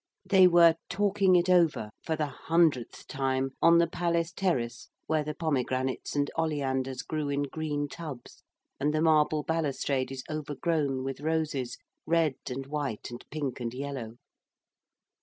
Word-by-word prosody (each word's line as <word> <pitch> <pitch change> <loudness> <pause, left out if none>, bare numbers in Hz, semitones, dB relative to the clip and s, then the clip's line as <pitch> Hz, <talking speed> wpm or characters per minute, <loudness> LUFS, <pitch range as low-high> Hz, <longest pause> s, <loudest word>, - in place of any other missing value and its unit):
They 190 -1 +6
were 170 -2 +6
'talking 195 0 +3
it 175 0 +3
over' 165 -12 +3
for 160 - -1
the 155 -1 0
hundredth 150 -2 0
time 135 0 -1
on 170 0 +7
the 170 - +5
palace 170 0 -1
terrace 130 -11 -2 0.2
where 155 -1 +1
the 150 0 -5
pomegranates 130 -5 -1
and 145 0 0
oleanders 135 -5 -1
grew 155 -2 -3
in 140 0 0
green 145 0 -3
tubs 150 -5 -9 0.4
and 150 +2 +1
the 155 - +1
marble 155 -1 +3
balustrade 140 -5 -1
is 130 -1 -6
overgrown 150 -2 -1
with 135 +1 -5
roses, 155 -5 -1 0.3
red 165 -3 +3 0.2
and 135 +1 -4
white 140 -6 -4
and 120 - -8
pink 140 -4 -3
and 120 0 -4
yellow. 130 -5 -5
150 Hz, 145 wpm, -29 LUFS, 135-165 Hz, 0.4 s, on